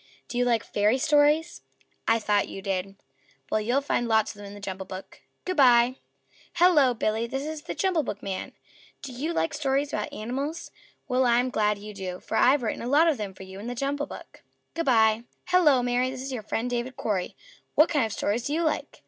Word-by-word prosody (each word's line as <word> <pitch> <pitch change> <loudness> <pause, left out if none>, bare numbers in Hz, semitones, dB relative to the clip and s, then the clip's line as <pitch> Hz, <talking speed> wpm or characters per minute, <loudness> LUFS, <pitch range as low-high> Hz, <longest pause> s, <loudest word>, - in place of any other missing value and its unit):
Do 245 - -3
you 245 - +3
like 230 -2 +2
Fairy 210 +4 +1
Stories? 295 +3 +2 0.5
I 225 - +4
thought 210 -2 +1
you 195 - -8
did. 195 0 -2 0.6
Well, 215 - +2
you'll 245 +6 +1
find 245 -4 -1
lots 220 -2 +2
of - - -16
them 205 -1 -9
in 200 - -10
the - - -10
JUMBLE 190 -1 -6
BOOK. 185 +1 -9 0.2
Good 370 - -2
by." 250 -1 +5 0.6
"Hello, 320 -8 +5
Billy." 220 +1 -1
"This 270 +3 -3
is 310 0 -5
the - - -6
JUMBLE 375 -5 +1
BOOKman. 195 -5 -5 0.5
Do 275 - -6
you 290 +7 -3
like 330 -1 -1
stories 285 -1 0
about 210 - -2
animals? 275 +9 -4 0.4
Well, 255 0 +2
I'm 245 +2 +2
glad 210 -2 +1
you 210 +1 -9
do, 185 -2 -6
for - - -5
I've 260 +1 +4
written 220 - -2
a 235 - -4
lot 300 +6 +4
of 315 -5 +2
them 200 -3 -5
for 190 - -10
you 190 +1 -10
in 215 - -7
the 245 - -4
JUMBLE 280 +3 -2
BOOK. - - -11 0.3
Good 330 -2 -3
by." 220 -2 +4 0.2
"Hello, 310 -9 +4
Mary!" 245 +1 +1
"This 260 0 -6
is 270 - -5
your 240 - -3
friend 225 +3 -2
David 245 +1 -3
Cory. 195 -5 -2 0.4
What 305 - +6
kind 295 -6 +2
of - - -9
stories 225 +5 -1
do 290 - -2
you 335 - 0
like? 315 - -2
245 Hz, 215 wpm, -26 LUFS, 210-285 Hz, 0.6 s, What